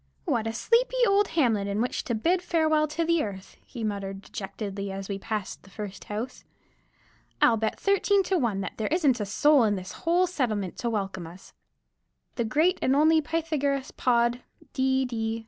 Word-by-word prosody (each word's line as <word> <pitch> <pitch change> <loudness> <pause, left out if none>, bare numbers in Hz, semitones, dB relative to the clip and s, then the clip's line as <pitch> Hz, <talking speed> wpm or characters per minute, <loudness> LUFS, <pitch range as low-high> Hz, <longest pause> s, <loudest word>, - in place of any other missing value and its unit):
"What 225 -1 0
a 225 - -2
sleepy 475 - +2
old 400 +1 +3
hamlet 225 -9 +2
in 200 +1 -2
which 245 +2 -1
to 235 - -1
bid 345 +11 +1
farewell 315 -3 +2
to 315 +3 -2 0.2
earth!" 195 -2 -8
he 240 -4 -8
muttered 200 -2 -4
dejectedly, 200 0 -5
as 195 0 -6
we 195 -1 -4
passed 215 -1 -4
the 195 - -18
first 200 -1 -8
house. 220 +5 -5 1.0
"I'll 235 - +5
bet 220 0 -2
13 400 0 +3
to 375 -1 0
1 220 -7 0
that - - -6
there 220 - -1
isn't 290 -7 +2
a 205 - -2
soul 290 +5 +4
in 210 -2 +2
the 185 - -5
whole 340 - +1
settlement 225 - -2
to 235 - -2
welcome 195 -5 -3
us. 175 +3 -14 0.8
The 235 - -1
great 320 - +2
and 260 - +2
only 315 +2 +5
Pythagoras 295 -4 -1
Pod, 240 0 +1 0.3
D. 265 0 +1
D. 225 -2 -2
235 Hz, 180 wpm, -27 LUFS, 205-310 Hz, 1.0 s, I'll